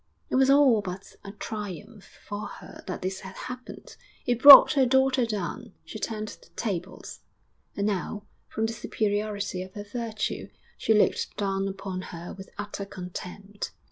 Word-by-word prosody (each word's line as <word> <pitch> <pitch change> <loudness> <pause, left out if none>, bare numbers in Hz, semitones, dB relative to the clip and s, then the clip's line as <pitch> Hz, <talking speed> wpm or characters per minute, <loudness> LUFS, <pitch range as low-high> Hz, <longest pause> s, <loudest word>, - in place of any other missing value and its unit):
It - - +1
was 265 +1 +4
all 275 -6 +6
but 185 0 -8
a 200 - -8
triumph 210 0 -7 0.2
for 205 0 -4
her - - -11
that 185 - -5
this 190 +1 -2
had 190 0 -10
happened. 250 0 -9 0.3
It 245 -1 0
brought 280 -1 +12
her 270 -3 +4
daughter 265 -1 +3
down; 215 +1 -4
she 215 - -8
turned 215 0 -3
the - - -14
tables, 190 -4 -4 0.6
and 200 - 0
now, 205 +1 -2 0.2
from 220 - -2
the 225 - -2
superiority 205 -3 -2
of 185 0 -9
her 205 - -5
virtue, 220 0 -4 0.3
she 220 - +2
looked 210 - +1
down 195 -1 -1
upon 195 -1 -5
her 170 -1 -8
with 190 0 -11
utter 205 -1 -5
contempt. 190 +2 -7
205 Hz, 160 wpm, -27 LUFS, 195-230 Hz, 0.6 s, brought